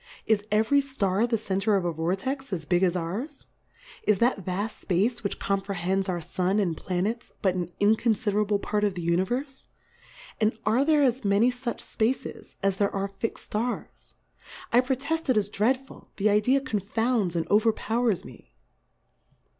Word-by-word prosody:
Is 215 -2 +3
e 210 +1 +4
very 280 +5 +3
Star 225 -6 0
the 230 -1 +1
Center 200 0 0
of 190 -3 0
a 175 - +1
Vortex, 195 - -2
as 165 -5 -3
big 175 +2 +2
as 185 -2 +2
ours? 210 - -4 0.6
Is 210 -2 +2
that 235 -2 +1
vaft 195 +5 -3
Space 215 +6 0
which 200 - -2
comprehends 195 -1 -1
our 175 -1 -1
Sun 185 +4 -1
and 175 -5 0
Planets, 190 +8 -2
but 190 -2 +3
an 175 -1 -3
inconfiderable 210 -1 +2
Part 210 +1 -1
of 200 -2 +1
the 175 - -4
Uni 170 +2 +2
verfe? 265 +5 -4 0.7
And 220 0 +1
are 225 +6 +3
there 300 -1 +4
as 255 -1 +1
many 205 +5 +3
fuch 245 -1 -4
Spaces, 235 +4 -2
as 195 -1 +1
there 200 0 +2
are 195 0 -2
fixM 200 +3 -4
Stars? 210 - -5 0.6
I 245 - +7
pro 260 +1 0
teft 320 +4 -3
it 255 - +4
is 205 -1 +1
dreadful, 255 +6 -1
the 210 +1 +3
Idea 250 +7 +3
confounds 220 -4 0
and 165 -1 -1
overpowers 220 0 +2
me. - - -14
210 Hz, 170 wpm, -27 LUFS, 190-240 Hz, 0.7 s, I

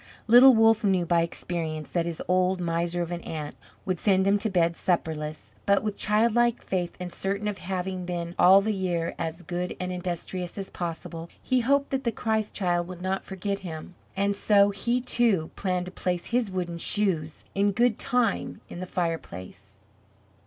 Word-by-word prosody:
Little 245 +3 +8
Wolff 225 0 +5
knew 190 -3 +2
by 170 0 +3
experience 165 -2 -4
that 170 -1 0
his 170 -2 -4
old 185 +1 +2
miser 170 0 -1
of 170 - -6
an 175 0 -3
aunt 150 -2 -6 0.3
would 185 -2 -1
send 190 -2 +3
him 200 +1 +3
to 220 - -1
bed 170 -3 +2
supperless, 155 -4 -2
but, 200 0 +4
with 210 -2 -2
childlike 235 +2 +2
faith 180 -2 -2
and 180 -1 -6
certain 200 +2 -2
of 205 -3 -3
having 185 0 -3
been, 175 -1 -4
all 190 +2 +8
the 215 +2 0
year, 175 -4 -1
as 165 +2 -4
good 180 +1 -4
and 180 0 -3
industrious 180 0 -4
as 195 -1 -6
possible, 165 -1 -5
he 255 -1 +1
hoped 280 +4 +2
that 270 0 -1
the 235 - +1
Christ 220 -1 -1
Child 175 -3 0
would 180 -1 -8
not 190 +1 -1
forget 200 +1 -3
him, 170 -2 -8 0.2
and 200 +1 +1
so 200 0 +4
he, 235 +5 0
too, 230 -9 +1
planned 180 -2 -1
to 180 - -8
place 180 -2 -2
his 235 -3 0
wooden 175 -2 -3
shoes 170 -7 -1
in 200 +1 +2
good 235 +2 +2
time 245 -4 0
in - - -7
the 185 - -5
fireplace. 165 - -5
185 Hz, 180 wpm, -27 LUFS, 175-205 Hz, 0.3 s, Little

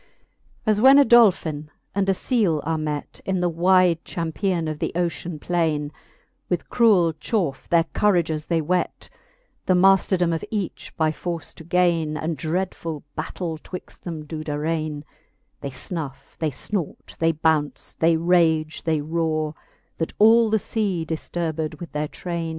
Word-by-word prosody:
As 215 -1 +2
when 270 +3 +8
a 285 - +7
Dolphin 175 -10 +4 0.2
and 195 0 0
a 195 - +3
Sele 200 - +1
are 160 0 0
met, 150 -1 -4
In 190 -1 -1
the 180 - +1
wide 175 0 +3
champian 170 +1 -2
of 155 -1 -4
the - - -1
ocean 170 -1 -2
plaine; 155 -3 -1 0.6
With 175 -2 -2
cruell 205 -9 +4
chaufe 170 - -2
their 170 -1 +4
courages 165 -7 +1
they 165 -2 +1
whet, 180 +3 -2 0.6
The 185 - +4
mayfterdome 185 -2 +4
of 165 - -3
each 205 -5 -4
by 155 -1 +2
force 170 -1 -5
to - - -12
gaine, 165 -3 +1
And 160 +2 -2
dreadfull 165 -1 -3
battaile 160 0 -4
twixt 180 - -10
them 160 -3 -6
do 155 0 -6
darraine: 155 0 -2 0.6
They 140 - -5
fnuf, 135 +1 -7
they 160 - +1
fnort, 170 +4 -5
they 165 0 +3
bounce, 155 -2 0
they 165 0 +3
rage, 160 -2 +2
they 160 -3 0
rore, 155 0 -1 0.5
That 165 - -2
all 225 +1 +6
the 220 - +3
fea, 195 -5 -1
difturbed 160 -1 -3
with 175 - -8
their 150 0 -2
traine. 170 0 -4
165 Hz, 150 wpm, -23 LUFS, 155-180 Hz, 0.6 s, when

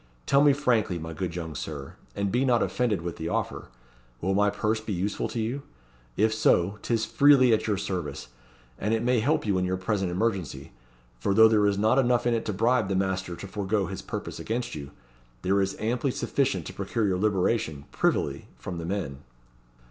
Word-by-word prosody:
Tell 140 +1 +4
me 145 - +7
frankly, 120 -10 +1
my 80 0 -6
good 85 +1 -4
young 80 -3 -5
Sir 70 -1 -6 0.2
and 100 -1 -1
be 125 +2 +2
not 125 -3 +3
offended 110 -8 0
with 85 -1 -4
the 80 - -3
offer - - -2 0.5
will 95 +6 0
my 105 +1 +3
purse 110 +2 -1
be 110 -1 -4
useful 95 +5 -1
to 115 - -4
you? 120 +6 -2 0.6
If 110 +1 +3
so, 100 -2 +2
'tis 115 -2 0
freely 140 -4 +5
at 110 - +1
your 105 -2 +1
service; 75 -10 -4 0.5
and 105 +3 +1
it 110 - -2
may 125 0 +3
help 130 +5 +1
you 100 -3 +1
in - - 0
your 95 0 -1
present 95 0 -1
emergency 95 -1 -2 0.5
for 95 +10 0
though 110 0 +8
there 105 -2 +3
is 100 -1 +1
not 110 +6 +3
enough 120 -2 +2
in 120 - +3
it 115 - -1
to - - -1
bribe 115 +3 +2
the 95 - -1
master 95 -2 -1
to 100 - -8
forego 100 0 -1
his - - -6
purpose - - -6
against 120 +2 -3
you, 70 -2 -6 0.5
there 100 +2 +2
is 95 0 -1
amply 120 +5 0
sufficient 135 +1 -1
to - - -7
procure 115 -3 -1
your 95 -2 +1
liberation, 95 -7 0
privily, - - 0
from 90 -2 -6
the 85 - -5
men." 85 -8 -3
105 Hz, 200 wpm, -27 LUFS, 90-115 Hz, 0.6 s, though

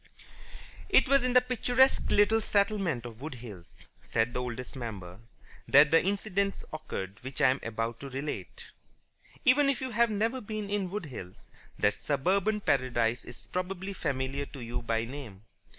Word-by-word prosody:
It - - +5
was 275 0 +4
in 250 -1 +1
the 250 - +7
picturesque 250 +1 +2
little 220 +2 +4
settlement 200 - +1
of 120 0 -9
Wood 150 -2 -5
Hills 105 -8 -12 0.2
(said 115 +2 0
the 125 - -1
Oldest 125 +1 -6
Member) 100 -7 -7 0.5
that 150 +2 +7
the 165 - +5
incidents 200 0 -1
occurred 100 -10 -5
which 130 +1 -6
I 130 - +6
am 135 - -2
about 115 +1 -3
to 140 - -7
relate. 135 +3 -5 0.8
Even 275 +2 +5
if 275 - 0
you 260 -1 -4
have 235 +1 +3
never 225 +5 0
been 210 -1 -5
in 200 -3 0
Wood 200 -1 -4
Hills, 100 -10 -10 0.3
that 105 0 +3
suburban 195 - 0
paradise 120 - +1
is 120 - -12
probably 190 +2 -3
familiar 135 -3 -2
to 135 - -10
you 120 +1 -4
by 115 0 -1
name. 115 -7 -9
145 Hz, 165 wpm, -30 LUFS, -, 0.8 s, the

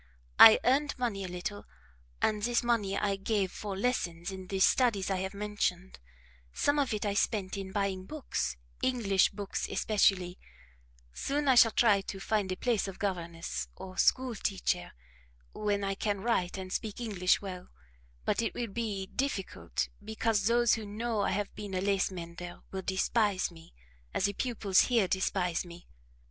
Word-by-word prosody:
I 220 - +11
earned 280 +3 +2
money 230 -6 -2
a - - -4
little, 180 +3 -5 0.6
and 210 -1 +2
this 240 +2 +1
money 215 -5 +1
I 200 -1 0
gave 195 -2 0
for 200 -2 -5
lessons 180 -6 -1
in 190 -1 -8
the 195 +1 -2
studies 200 -2 +3
I 190 - +1
have 190 +2 -4
mentioned; 200 - -2 0.5
some 285 - +1
of 275 -3 +1
it 215 -1 -2
I 205 - 0
spent 200 -2 0
in 195 -1 -5
buying 190 -2 -2
books, 70 - -3 0.2
English 210 -7 +3
books 200 -1 -4
especially; 190 -3 +1 0.7
soon 290 - -1
I 265 - +6
shall 235 -2 +7
try 215 -3 +4
to 195 0 -7
find 200 -1 0
a - - -1
place 230 0 0
of 195 - -7
governess, 170 - -3
or 185 -1 -9
school 255 -2 +3
teacher, 190 - -2 0.6
when 205 -1 -1
I 195 0 0
can 200 0 -2
write 195 -5 0
and 185 -1 -6
speak 215 -1 -3
English 195 -6 +1
well; 185 -3 -7 0.6
but - - +1
it 225 - -2
will 235 -2 -3
be 205 -2 -3
difficult, 255 -3 -2 0.2
because 220 -1 0
those 235 0 +4
who 220 -2 -2
know 220 +1 -2
I - - +1
have 205 +1 -2
been 205 -2 -6
a - - +1
lace 195 0 +1
mender 175 -1 -8
will 190 - -4
despise 190 +1 +1
me, 165 - -16 0.4
as - - +2
the 200 - 0
pupils 205 -5 +1
here 230 -6 +2
despise 180 -2 0
me. 175 0 -12
200 Hz, 170 wpm, -30 LUFS, 185-225 Hz, 0.7 s, I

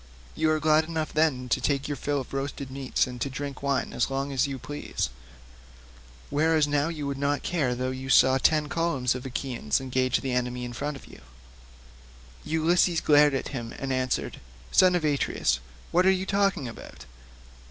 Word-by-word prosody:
You 160 - +1
are 155 0 +2
glad 155 +1 +3
enough 160 -1 -3
then 150 -5 +1
to 130 - +1
take 140 +1 0
your 145 - -2
fill 145 +1 -1
of 130 - -11
roast 135 +1 -3
meats 135 -1 0
and 125 -1 -8
to 140 - -1
drink 140 0 -6
wine 140 -1 -1
as 120 - 0
long 135 +1 -2
as 135 +1 +1
you 135 -1 -4
please, 145 +3 -4 1.2
whereas 155 0 +3
now 145 +1 +1
you 155 -3 -4
would 140 -1 -3
not 140 0 0
care 140 -9 0
though 130 +1 -2
you 130 +1 -6
saw 130 0 +5
ten 155 +2 +3
columns 145 -6 0
of 130 +1 -6
Achaeans 125 - -2
engage 130 -1 0
the 135 - -3
enemy 125 0 -1
in 120 - -6
front 145 +4 -4
of - - -14
you." - - -14 1.2
Ulysses 165 +2 +2
glared 145 -2 +5
at 135 - -3
him 120 -4 -6
and 135 -1 -2
answered, 130 -1 -1 0.3
"Son 185 -1 +5
of 170 -3 0
Atreus, 140 - +1 0.3
what 180 +2 +4
are - - +7
you 190 0 +1
talking 195 -8 +1
about? 115 - -10
140 Hz, 185 wpm, -27 LUFS, 130-155 Hz, 1.2 s, are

